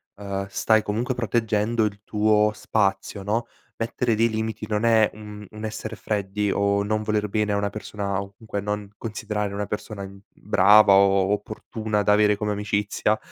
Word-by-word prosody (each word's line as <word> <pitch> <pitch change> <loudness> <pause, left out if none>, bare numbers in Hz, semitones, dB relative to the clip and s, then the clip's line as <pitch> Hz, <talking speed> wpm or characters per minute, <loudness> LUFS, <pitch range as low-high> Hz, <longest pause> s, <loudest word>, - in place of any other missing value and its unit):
uhm, 100 -1 -4
stai 110 +2 +2
comunque 120 +5 -2
proteggendo 115 -1 0
il 100 -1 -4
tuo 105 0 +2
spazio, 100 -2 -1
no. 115 +4 -1 0.3
Mettere 115 0 0
dei 115 +2 +3
limiti 110 -1 -3
non 105 +1 -1
è 110 -2 +4
un 105 -1 -10
un 110 0 -10
essere 110 0 -5
freddi 105 -1 -2
o 100 0 +1
non 110 +1 -1
voler 105 -1 0
bene 105 0 0
a - - +1
una 100 0 0
persona, 100 -2 -4
comunque 100 +2 -5
non 105 0 -3
considerare 105 -2 -3
una 105 +1 -2
persona, 105 0 -5
mhmm, 100 0 -12
brava 100 +1 +5
o 95 0 +4
opportuna 105 0 -2
da 105 - +3
avere 105 0 +4
come 105 +1 -2
amicizia, 105 +1 0
105 Hz, 165 wpm, -24 LUFS, 100-110 Hz, 0.3 s, brava